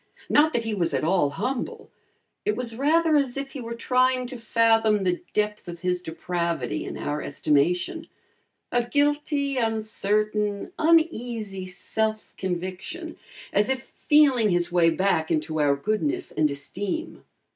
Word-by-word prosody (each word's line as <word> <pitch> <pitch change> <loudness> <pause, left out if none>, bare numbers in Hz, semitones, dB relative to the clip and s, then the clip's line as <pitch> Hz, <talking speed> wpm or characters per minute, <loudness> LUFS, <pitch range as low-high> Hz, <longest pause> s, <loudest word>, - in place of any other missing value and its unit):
Not 310 +2 +5
that 235 - 0
he 225 -1 -2
was 175 -5 0
at - - -1
all 165 -3 +3
humble; 250 - -4 0.5
it 420 - 0
was 235 -2 -2
rather 310 +5 +3
as 275 -3 +1
if 275 0 -4
he 270 - -6
were 235 0 -5
trying 255 +1 +2
to 250 +1 -7
fathom 225 -3 +3
the 180 -1 0
depth 210 -1 -1
of 170 -1 -7
his 180 -1 0
depravity 170 -1 -2
in - - -6
our 145 +1 -3
estimation: 175 - 0 0.6
a 245 0 +2
guilty, 285 +1 0
uncertain, 215 - 0
uneasy, 240 - +1
self 215 +4 -3
conviction, 190 - -4 0.4
as 205 +3 +2
if 265 -2 -1
feeling 270 -7 +3
his 175 -1 +1
way 175 -2 +4
back 165 -2 +1
into 155 -1 -1
our 145 -1 +3
goodness 215 - -1
and 155 -1 +2
esteem. 200 - -5
220 Hz, 145 wpm, -25 LUFS, 180-265 Hz, 0.6 s, Not